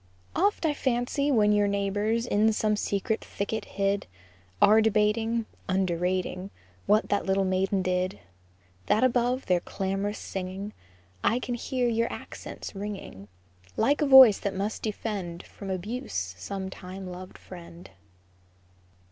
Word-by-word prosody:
Oft 395 -1 +2
I 305 - +2
fancy 265 +2 0
when 210 -5 +4
your 205 0 +3
neighbors, 205 +3 0
In 220 -1 +3
some 215 0 +1
secret 210 +2 -1
thicket 210 +2 -3
hid, 200 0 -1 0.5
Are 215 +2 +6
debating, 220 +2 +2 0.2
Underrating 185 0 0 0.4
What 210 +2 +3
that 205 - 0
little 195 0 +2
maiden 190 +1 +1
did, 185 0 -1 0.7
That 220 - +3
above 250 +1 +2
their 180 -1 +3
clam'rous 195 +3 -3
singing 190 +2 -5 0.5
I 235 - +3
can 250 0 -3
hear 250 +1 -1
your 230 0 +1
accents - - -8
ringing, 195 - -7 0.5
Like 290 +2 +2
a 295 - +3
voice 265 -6 +9
that 200 -1 -3
must 200 +3 -2
defend 200 -5 -4
From 195 - -9
abuse 185 - -3
some 190 - -5
time 185 +1 -8
loved 180 0 -8
friend. 170 - -12
205 Hz, 130 wpm, -27 LUFS, 190-230 Hz, 0.7 s, voice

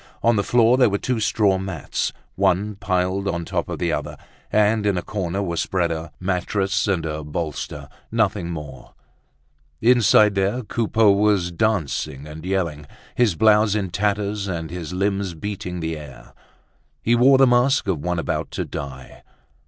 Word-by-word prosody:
On 115 0 +4
the 100 - +1
floor 120 +3 +4
there 125 -3 +5
were 100 - 0
two 125 +2 -2
straw 100 -3 +2
mats, 95 -3 -3 0.2
one 100 +2 +1
piled 95 0 -1
on 85 -3 -2
top - - -2
of - - -4
the - - -1
other; - - -4 0.3
and 105 0 +3
in 100 -3 +1
a 90 - -2
corner 95 -1 -3
were 85 -3 -3
spread 90 -2 0
a 80 -1 -5
mattress 95 +2 -1
and 90 -5 0
a 75 -1 -4
bolster, 75 0 -5 0.2
nothing 105 -6 0
more. 75 -6 -8 0.8
Inside 110 -3 +5
there 100 +6 0
Coupeau 110 -1 +2
was 100 -3 +2
dancing 80 -8 -1
and 75 +1 -9
yelling, 85 -6 -2 0.3
his 115 -8 +2
blouse 105 +1 +4
in 95 -4 -2
tatters 100 +1 -1
and 80 -4 -4
his 85 -2 -6
limbs 95 -1 -1
beating 90 -1 -5
the 80 0 -2
air. 75 -4 -12 0.7
He 115 - +2
wore 130 +3 +6
the 135 - +6
mask 125 +2 +3
of 90 -6 0
one 90 +4 -2
about 85 - -2
to - - -2
die. 65 -2 -8
95 Hz, 165 wpm, -22 LUFS, 85-105 Hz, 0.8 s, wore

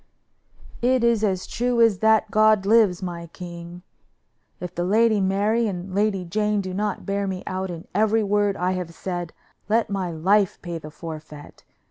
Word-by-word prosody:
"It 250 0 +2
is 235 -2 +3
as 190 -3 0
true 245 0 -1
as 225 -5 +4
that 220 -1 +3
God 215 -2 +4
lives, 205 -4 +4
my 170 -2 -5
king! 175 +1 -9 0.8
If 180 0 -6
the 175 - -2
Lady 215 +2 +3
Mary 205 +4 +1
and 185 -1 -5
Lady 200 -2 0
Jane 210 +4 0
do 185 -2 -4
not 205 +2 -2
bear 200 0 -1
me 190 -1 -4
out 190 0 -3
in 170 -1 -8
every 220 +2 +2
word 205 0 +1
I 180 +1 0
have 180 -3 -4
said, 175 -2 -4 0.4
let 225 -1 +1
my 190 -3 -1
life 190 +5 +2
pay 170 -2 -5
the 155 - -9
forfeit. 155 -2 -10
195 Hz, 170 wpm, -23 LUFS, 175-215 Hz, 0.8 s, as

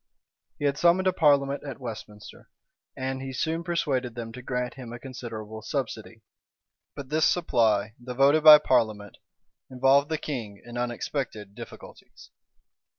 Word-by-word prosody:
He 145 - -3
had 140 0 0
summoned 175 +2 +4
a 185 - +3
parliament 140 -4 +2
at 140 -2 -7
Westminster;[] 110 -4 -9 0.5
and 130 0 -3
he 135 0 -5
soon 160 +6 -2
persuaded 145 -9 -1
them 115 -1 -6
to 125 +2 -9
grant 125 0 -3
him 125 -3 -9
a 120 - -6
considerable 110 -4 -8
subsidy.[] 115 -3 -5 0.7
But 140 -2 -8
this 155 +1 +3
supply, 110 - +1
though 125 0 -7
voted 140 +4 +4
by 155 -1 +12
parliament, 110 -8 0 0.5
involved 135 +3 +3
the 160 - 0
king 115 -10 -6
in 120 0 -10
unexpected 120 -3 -4
difficulties. - - -13
130 Hz, 145 wpm, -26 LUFS, 115-145 Hz, 0.7 s, by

